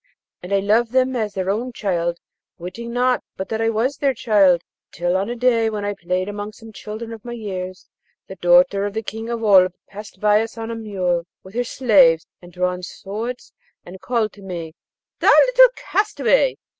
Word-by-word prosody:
And 180 - -9
I 200 0 +2
loved 225 +4 +2
them 260 0 +2
as 215 -4 -2
their 190 0 -1
own 240 +5 -3
child, 175 -5 -1 0.4
witting 190 +7 -7
not 250 +1 +1
but 190 - -5
that 220 0 -2
I 225 - +2
was 235 +5 0
their 275 -2 +1
child, 200 -7 +3 0.3
till 175 +1 -1
on 195 +3 0
a 240 - -3
day 235 -2 +2
while 210 -2 -4
I 205 - -1
played 185 -1 -2
among 205 +1 -6
some 225 0 -14
children 220 +3 -7
of 225 -1 -11
my 240 - -6
years, 185 -5 -6 0.4
the - - -8
daughter 180 +3 +4
of 205 - -8
the 220 - -2
King 225 +2 -6
of 235 -1 -3
Oolb 185 -4 +5
passed 205 -1 -11
by 210 +1 +4
us 225 0 -6
on 225 0 -5
a - - -4
mule, 185 -6 -2 0.2
with 190 - -14
her 245 +2 0
slaves 190 -10 +4 0.2
and 175 0 -14
drawn 180 0 -2
swords, 215 +7 -6 0.3
and 185 +1 -11
called 230 -4 -1
to 205 - -15
me, 170 -4 -6 0.5
'Thou - - +3
little - - +7
castaway!' - - +1
210 Hz, 195 wpm, -21 LUFS, 185-230 Hz, 0.5 s, little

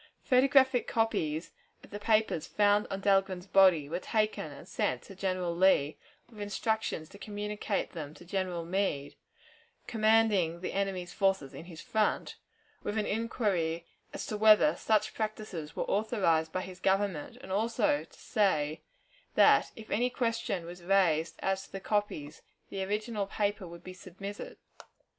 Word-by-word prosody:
Photographic 265 -1 +4
copies 165 -8 0 0.3
of - - -15
the 205 - -5
papers 215 -6 +1
found 205 0 +3
on 195 0 -4
Dahlgren's 195 -2 +2
body 185 -6 +5
were 170 +4 -3
taken 215 +2 -1
and - - -12
sent - - -1
to 195 - -11
General 185 -2 -1
Lee, 170 -5 +4 0.3
with 225 -3 -15
instructions 205 -5 -2
to 200 - -14
communicate 210 -1 -3
them 155 -3 -7
to 175 - -14
General 180 -2 -2
Meade, 170 -6 -1 0.7
commanding 215 -6 +2
the 185 - -4
enemy's 190 -2 -2
forces 195 -9 +1
in - - -9
his 170 -2 -10
front, 215 -1 0 0.5
with 205 - -3
an 215 - +1
inquiry 195 -7 -1 0.3
as - - -5
to 215 - -3
whether 210 -7 +6
such 215 +3 +1
practices 215 -8 -4
were - - -1
authorized 190 -7 +1
by 185 - -2
his 185 -1 -9
Government, 190 -5 0
and - - -10
also 230 +8 +1
to - - -20
say 160 -9 +1 0.5
that, - - +5
if 220 -3 -11
any 245 +4 +2
question 230 -7 -2
was 175 +1 -9
raised 170 -4 +2
as 195 0 0
to - - -27
the 195 - -5
copies, 190 -8 -2 0.3
the 195 -1 -3
original 210 +1 -2
paper 205 -2 -1
would 170 0 -11
be 185 - -8
submitted. 195 +3 -8
195 Hz, 150 wpm, -30 LUFS, 175-215 Hz, 0.7 s, whether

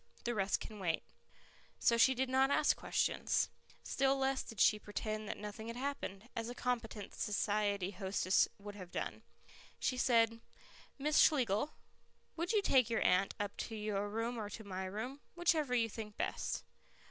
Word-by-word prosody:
The 240 - 0
rest 200 -3 +1
can 215 -1 -8
wait." 165 -4 0 0.7
So 235 - +4
she 245 +3 +5
did 260 +2 +1
not 265 +1 +3
ask 285 - +4
questions. - - +1 0.3
Still 270 0 +2
less 270 0 +1
did 225 - -9
she 210 - +5
pretend 215 +1 -4
that - - -3
nothing 210 +2 -7
had 230 - -5
happened, 245 -6 -4
as 230 0 -2
a 245 - -6
competent 230 -5 -3
society 205 -2 0
hostess 190 -1 +2
would 205 0 -8
have 185 -3 -9
done. - - -4 0.6
She 255 - 0
said, 230 -2 +3 0.6
"Miss 300 +2 +2
Schlegel, 255 -1 +4 0.6
would 340 +1 -1
you 425 -3 +3
take 255 - +4
your 230 - +1
aunt 185 +2 +3
up 205 -1 -2
to 225 - -4
your 210 -1 -2
room 230 +3 -2
or 210 -1 -4
to 220 +2 -7
my 190 -2 -4
room, 220 +9 -5 0.2
whichever 315 -7 +2
you 230 -2 +3
think 210 -1 -7
best. - - -2
225 Hz, 170 wpm, -36 LUFS, 205-255 Hz, 0.7 s, she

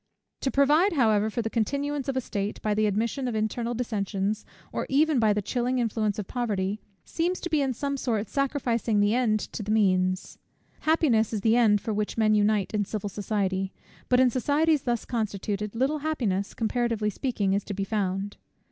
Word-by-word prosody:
To 270 - -1
provide, 300 +8 +4
however, 220 -6 +3
for 235 +2 -2
the 225 - -2
continuance 280 +5 -1
of 265 - -1
a - - +1
state, 205 -3 -3
by 215 - +1
the 215 +1 +2
admission 230 +6 -1
of 240 - -2
internal 230 +2 -1
dissensions, 210 -3 -2 0.3
or - - -2
even 295 0 +3
by 220 -2 +4
the 205 0 0
chilling 250 +4 -1
influence 220 -3 0
of 210 - -3
poverty, 205 -3 -2 0.2
seems 350 +2 -1
to 350 - -4
be 305 -2 +3
in 270 -1 +1
some 280 +3 -2
sort 225 -5 -1
sacrificing 245 -6 0
the 205 +1 +3
end 230 -3 +2
to - - -4
the 210 - -6
means. 185 -3 +1 0.4
Happiness 265 -9 +2
is 210 - -1
the 225 +2 +3
end 215 -4 +4
for 220 - -2
which 210 +1 -2
men 215 -1 +3
unite 210 -1 +2
in 210 -1 +1
civil 205 0 -4
society; 195 -2 -2 0.4
but 250 - +4
in 255 -1 +5
societies 295 +4 +2
thus 240 -3 -1
constituted, 210 -2 -3
little 270 +6 +1
happiness, 230 -11 -1
comparatively 225 -2 0
speaking, 205 -5 -1
is 200 0 0
to 200 - -5
be 195 - -1
found. 195 -1 -2
220 Hz, 190 wpm, -27 LUFS, 205-255 Hz, 0.4 s, in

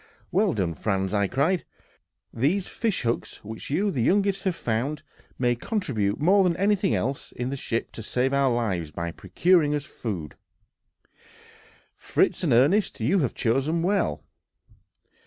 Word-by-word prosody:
"Well 195 -1 +2
done, 90 -5 -1
Franz," 95 +1 -1 0.2
cried 140 +8 +2
I; - - -21 0.7
"these 160 - +1
fish 225 -5 -2
hooks, 115 0 -2
which 110 +1 -7
you, 195 +8 +1
the 130 - -1
youngest, 195 - +2
have 185 -3 +1
found, 130 +6 -2 0.3
may 120 -1 +2
contribute 120 - -1
more 190 +6 +5
than 175 -2 +1
anything 195 -1 +2
else 135 +3 -2
in 125 +2 -4
the - - -2
ship 115 -3 -3
to - - -8
save 125 +5 0
our 140 -2 +3
lives 100 -9 -1
by 85 +2 -4
procuring 155 - +2
food 105 - -5
for - - -43
us. - - -39 0.8
Fritz - - 0
and - - +1
Ernest, 150 - +3
you 150 - +2
have 135 -7 -1
chosen 135 +8 +1
well." 200 +3 0
140 Hz, 155 wpm, -25 LUFS, 115-185 Hz, 0.8 s, more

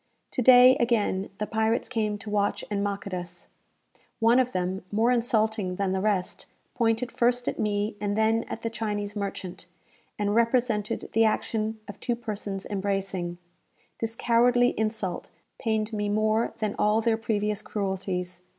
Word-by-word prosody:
To - - -1
day, 250 +1 +8
again, 215 -5 +1
the 210 - -2
pirates 220 +1 0
came 215 -4 -1
to 210 +1 -9
watch 205 0 0
and 200 -1 0
mock 200 -1 -3
at 200 - -6
us. 175 -1 -6 0.7
One 230 +2 +5
of 250 -1 +1
them, 185 0 -2
more 225 +4 +3
insulting 220 -5 +1
than 195 0 -1
the 190 0 0
rest, 200 -3 -1 0.3
pointed 230 +1 +1
first 245 +1 +1
at - - -2
me 210 0 0
and 205 0 -1
then 220 +1 +3
at - - -7
the 230 - -2
Chinese 205 -2 -3
merchant, 195 -3 -5 0.5
and 205 0 0
represented 230 -2 +1
the 225 +1 +4
action 220 0 -1
of 205 -1 -9
two 240 - -1
persons 205 -4 -5
embracing. 195 -3 -2 0.6
This 225 0 -2
cowardly 245 +1 +3
insult 215 -4 -2 0.3
pained 220 -1 -1
me 205 -1 -1
more 215 +2 +1
than 215 -2 -1
all 210 +1 +3
their 225 0 +2
previous 210 -2 -1
cruelties. 190 -3 -3
215 Hz, 160 wpm, -27 LUFS, 200-230 Hz, 0.7 s, day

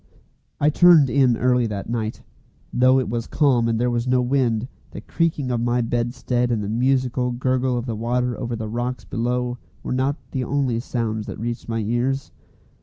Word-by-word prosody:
I 150 +1 +3
turned 160 -5 +6
in 125 -2 +3
early 125 -1 +2
that 100 -2 -5
night. 115 -1 -3 0.5
Though 130 +1 +4
it 130 - -2
was 115 0 -3
calm 130 -6 +2
and 115 -1 0
there 125 +1 +1
was 120 +1 -1
no 125 0 +3
wind, 125 -2 +1 0.2
the - - -9
creaking 155 -6 -1
of 120 -1 0
my 120 +1 +1
bedstead 120 +1 -1
and 115 -3 0
the 100 - -4
musical 125 +1 +1
gurgle 130 0 0
of 120 - -3
the 115 -3 -3
water 120 +2 -1
over 120 0 -4
the 110 -1 -5
rocks 120 +3 -3
below 125 +1 -2 0.2
were - - -3
not 130 +2 +1 0.2
the 130 -2 -2
only 130 -2 0
sounds 110 -3 -3
that - - -6
reached 120 +1 -4
my 115 0 -1
ears. 120 +5 -1
125 Hz, 185 wpm, -22 LUFS, 115-130 Hz, 0.5 s, turned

